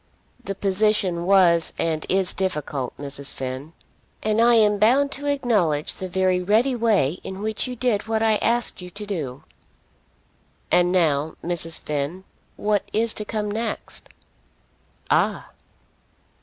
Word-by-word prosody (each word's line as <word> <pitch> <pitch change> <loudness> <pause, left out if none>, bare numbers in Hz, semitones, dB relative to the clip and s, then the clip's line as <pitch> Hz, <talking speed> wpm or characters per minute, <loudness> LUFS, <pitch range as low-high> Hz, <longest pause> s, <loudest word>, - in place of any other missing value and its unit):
"The 195 - -4
position 195 -3 +1
was 175 -4 +4
and 160 -2 -1
is 190 -1 +1
difficult, 150 -8 -3
Mrs. 140 -1 -3
Finn." 130 +4 -5 0.5
"And 215 +1 +2
I 240 0 +5
am 210 -2 +4
bound 270 +7 +3
to 285 +1 -2
acknowledge 210 - +1
the 185 - -6
very 185 0 +1
ready 220 +8 +2
way 205 - +1
in 190 0 -7
which 220 +3 -1
you 250 - -5
did 225 -4 -1
what 220 0 0
I 220 -1 +3
asked 235 -3 0
you 180 - -8
to 205 +3 -7
do." 150 -11 -5 1.3
"And 175 0 +4
now, 160 -4 +1
Mrs. 165 -1 +1
Finn, 150 +5 -4 0.3
what 205 -1 0
is 225 +1 +1
to 210 - -5
come 210 -1 -3
next?" 225 +2 -5 1.0
"Ah!" - - +1
190 Hz, 140 wpm, -23 LUFS, 165-220 Hz, 1.3 s, I